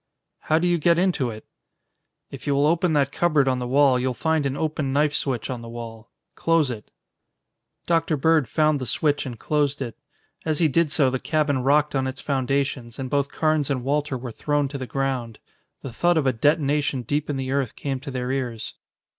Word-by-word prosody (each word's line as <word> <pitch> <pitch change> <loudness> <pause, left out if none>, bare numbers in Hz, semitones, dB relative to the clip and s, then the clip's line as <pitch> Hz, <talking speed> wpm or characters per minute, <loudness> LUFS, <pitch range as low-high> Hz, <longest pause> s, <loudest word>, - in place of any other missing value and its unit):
"How 155 - +1
do 175 +2 +1
you 175 -1 +2
get 170 +2 +3
into 175 -8 +1
it?" 110 -1 -9 0.9
"If - - -9
you 140 - +2
will 140 +1 +3
open 165 +2 +2
that 140 -2 +2
cupboard 150 -5 +2
on 130 -1 +1
the 125 - -3
wall, 135 0 +4
you'll 125 0 -1
find 160 +1 +1
an 135 +1 -3
open 155 -3 -1
knife 145 +2 +2
switch 125 -7 -1
on 125 -2 -5
the 115 - -9
wall. 115 -1 -8 0.2
Close 165 -5 +2
it." 105 -4 -8 1.0
Dr. 165 -2 +1
Bird 155 -1 +3
found 155 -2 +2
the 130 - -3
switch 145 0 0
and 120 -3 -6
closed 145 +2 0
it. 125 -4 -5 0.5
As 155 -2 0
he 170 - +4
did 155 +2 +2
so 140 -3 +2
the 130 - -1
cabin 150 -2 0
rocked 145 +3 +3
on 135 -1 0
its 130 +1 -5
foundations 135 -3 -1
and 130 -1 -5
both 140 -1 +1
Carnes 155 -2 0
and 130 -3 -1
Walter 145 0 0
were 125 -1 -6
thrown 145 +4 0
to 140 0 -6
the 130 - -5
ground. 130 -5 -2 0.5
The 130 - -6
thud 175 +7 +2
of 155 - +1
a 130 - +3
detonation 145 0 +1
deep 145 +6 -2
in 145 - -1
the 130 0 -3
earth 135 -4 -1
came 135 -2 -3
to 140 +2 -8
their 125 -1 -3
ears. 125 -5 -3
140 Hz, 210 wpm, -24 LUFS, 130-150 Hz, 1.0 s, wall